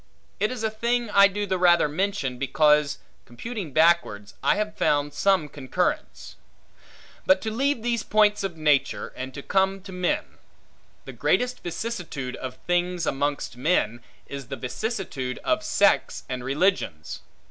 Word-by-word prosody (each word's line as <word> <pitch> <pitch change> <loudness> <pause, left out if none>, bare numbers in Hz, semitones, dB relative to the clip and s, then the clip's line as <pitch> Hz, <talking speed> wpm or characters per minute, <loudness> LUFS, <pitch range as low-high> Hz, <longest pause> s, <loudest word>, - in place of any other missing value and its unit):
It 210 - +2
is 250 -3 -5
a 220 - 0
thing 235 +1 -1
I 200 0 +7
do 205 +1 -3
the 190 -2 -1
rather 175 -3 +5
mention, 150 -6 -2
because, 150 +2 +3 0.3
computing 190 - -6
backwards, 155 -11 +2
I - - +3
have 210 0 -2
found 145 0 +1
some 190 -6 +2
concurrence. 140 -3 -3 0.9
But 185 0 +5
to 220 - -3
leave 265 +1 0
these 235 -2 0
points 210 -1 +3
of 185 -4 -4
nature, 150 -3 +1
and 130 +1 -5
to 140 - -7
come 190 0 +1
to 195 0 -11
men. 180 -1 -2 0.7
The - - -8
greatest 250 0 0
vicissitude 175 - -4
of 130 -1 -7
things 175 -1 0
amongst 140 -3 -2
men, 125 -5 +1 0.2
is 140 -3 -7
the 135 - -5
vicissitude 135 - -4
of 315 0 +1
sects 200 -8 +2
and 130 -1 -4
religions. 135 - -1
175 Hz, 145 wpm, -25 LUFS, 140-210 Hz, 0.9 s, I